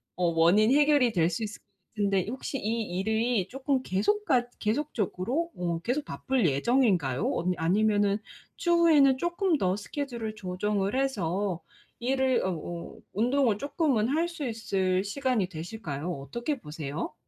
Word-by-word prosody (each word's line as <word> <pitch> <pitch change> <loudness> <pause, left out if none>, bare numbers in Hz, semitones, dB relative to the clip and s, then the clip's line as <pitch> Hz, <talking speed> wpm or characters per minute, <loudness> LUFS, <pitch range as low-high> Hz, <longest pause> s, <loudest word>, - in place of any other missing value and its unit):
어 180 - 0
원인 170 +7 +4
해결이 290 -4 +4
될 170 -3 +2
수 180 +6 -3
있을 215 0 -6
것 - - -46 0.3
같은데, 200 -3 +1
혹시 265 +3 -4
이 230 -1 -1 0.2
일이 220 0 +1
조금 270 0 -1
계속 260 - 0
같 245 - +2
계속적으로 245 - -1
어 170 -2 -2
계속 260 +7 -1
바쁠 260 -8 0
예정인가요? 165 - +2
어 - - -2
아니면은 205 +4 +2 0.4
추후에는 325 -7 +5
쪼끔 345 +1 +1
더 185 0 +1
스케줄을 235 0 -4
조정을 200 +4 -1
해서 195 -8 -1 0.4
일을 260 +1 +1
어 190 - 0
어 170 0 -6 0.2
운동을 235 0 +2
쪼끔은 285 -6 +1
할 320 +5 +1
수 330 -5 -5
있을 190 -5 0
시간이 245 -2 0
되실까요? 170 -2 -5
어떻게 235 - -4
보세요? 150 -3 -5
220 Hz, 300 characters per minute, -28 LUFS, 185-265 Hz, 0.4 s, 추후에는